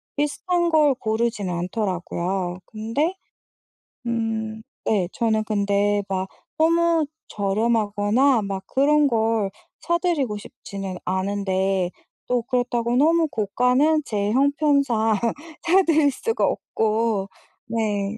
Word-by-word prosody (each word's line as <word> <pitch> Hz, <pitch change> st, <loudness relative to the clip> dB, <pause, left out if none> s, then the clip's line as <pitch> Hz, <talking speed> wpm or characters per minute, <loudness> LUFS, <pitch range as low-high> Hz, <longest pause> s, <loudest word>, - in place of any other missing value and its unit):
비슷한 345 Hz, +4 st, 0 dB
걸 300 Hz, -4 st, +4 dB
고르진 220 Hz, -3 st, -1 dB
않더라고요. 180 Hz, -1 st, -2 dB
근데 230 Hz, -, -2 dB, 0.9 s
음 220 Hz, -1 st, -2 dB, 0.2 s
네 195 Hz, -5 st, +1 dB
저는 220 Hz, -2 st, +1 dB
근데 205 Hz, -1 st, +1 dB
막 190 Hz, 0 st, -1 dB, 0.4 s
너무 335 Hz, -1 st, +3 dB, 0.2 s
저렴하거나 215 Hz, +4 st, +1 dB
막 195 Hz, -1 st, -4 dB
그런 295 Hz, +5 st, +3 dB
걸 225 Hz, -4 st, +1 dB, 0.3 s
사 340 Hz, 0 st, +2 dB
드리고 295 Hz, -, 0 dB
싶지는 195 Hz, -2 st, -7 dB
않은데 190 Hz, -1 st, 0 dB, 0.4 s
또 245 Hz, -1 st, +1 dB
그렇다고 245 Hz, -1 st, 0 dB
너무 325 Hz, +3 st, +4 dB
고가는 250 Hz, +7 st, +2 dB
제 205 Hz, -3 st, -1 dB
형편상 280 Hz, -5 st, +2 dB, 0.5 s
사 365 Hz, +3 st, +5 dB
드릴 310 Hz, -3 st, +4 dB
수가 450 Hz, -, -1 dB
없고. 220 Hz, -2 st, 0 dB, 0.4 s
네. 215 Hz, -2 st, -1 dB
225 Hz, 210 characters per minute, -23 LUFS, 200-280 Hz, 0.9 s, 사